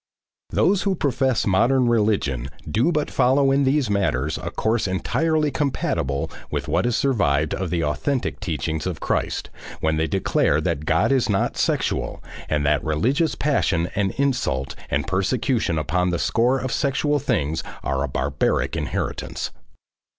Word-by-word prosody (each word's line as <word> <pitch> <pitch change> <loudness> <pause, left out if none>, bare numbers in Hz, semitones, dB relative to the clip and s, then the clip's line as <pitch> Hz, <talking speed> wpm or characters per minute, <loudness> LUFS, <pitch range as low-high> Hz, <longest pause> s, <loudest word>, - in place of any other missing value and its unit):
Those 200 -1 +2
who 195 -2 +1
profess 135 -5 +1
modern 120 +6 +3
religion 100 - +1 0.2
do 120 +11 +2
but 150 -3 -1
follow 135 +2 +3
in 140 0 +3
these 135 -1 +2
matters 80 -8 0
a - - -4
course 110 -1 0
entirely 155 - 0
compatible 80 - -1 0.2
with - - -3
what - - +1
has 120 -1 +1
survived 80 - +1
of 95 -1 -2
the 85 -1 0
authentic 125 - -1
teachings 80 -3 -2
of 90 - -4
Christ, - - -2 0.3
when 80 0 +1
they 80 +1 +1
declare - - +1
that 75 - -2
God 80 - +2
is 130 -4 +2
not 100 -2 +1
sexual, - - -1 0.3
and 75 -2 0
that 75 0 +2
religious 125 - +1
passion 90 - +1
and 100 -1 +1
insult 125 - -1 0.2
and - - 0
persecution 100 - 0
upon 90 +4 0
the 85 - 0
score 120 +8 +2
of 130 -1 -3
sexual 145 +2 +1
things 80 - 0 0.2
are 65 0 -1
a - - -1
barbaric 65 +1 0
inheritance. - - -3
105 Hz, 150 wpm, -23 LUFS, -, 0.3 s, modern